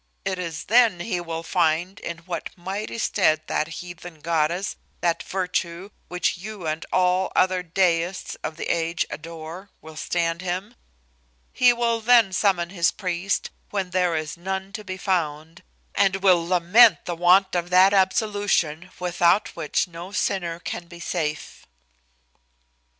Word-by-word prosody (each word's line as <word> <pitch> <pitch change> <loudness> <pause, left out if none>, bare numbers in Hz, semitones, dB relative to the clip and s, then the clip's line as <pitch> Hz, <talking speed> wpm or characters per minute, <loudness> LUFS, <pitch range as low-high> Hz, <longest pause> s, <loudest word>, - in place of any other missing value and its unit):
It 190 -1 -2
is 170 -3 -4
then 225 -6 +4
he 180 -3 -2
will 165 -1 -5
find 170 +2 0
in 170 - -5
what 175 -2 -4
mighty 195 +6 -5
stead 155 -8 +2
that 155 - -1
heathen 175 0 -9
goddess, 170 +3 0 0.3
that 170 -1 +1
virtue, 180 0 -3 0.2
which 180 0 -1
you 205 -2 -7
and 155 +1 -2
all 185 +1 +2
other 185 0 +3
deists 180 0 0
of 155 - -4
the - - -4
age 170 +1 0
adore, 165 +4 -8
will 160 0 -12
stand 165 +1 -1
him. 185 +5 -4 0.8
He 250 -1 +5
will 235 -1 0
then 230 -4 +5
summon 175 -2 +1
his 170 -3 +2
priest, 180 +1 -2 0.2
when 195 -3 -3
there 180 -2 +1
is 155 -1 -3
none 190 +2 -4
to 215 - -6
be 185 -1 -6
found, 165 -3 -2 0.3
and 195 0 +2
will 175 -3 +4
lament 185 +6 +5
the 175 - -3
want 180 +3 +4
of 175 -1 -1
that 185 +2 +6
absolution, 190 -4 +1
without 175 +2 +2
which 165 +3 0
no 175 +2 -9
sinner 175 -5 -1
can 175 0 -6
be 170 0 -12
safe." 155 -3 -4
180 Hz, 145 wpm, -24 LUFS, 170-190 Hz, 0.8 s, that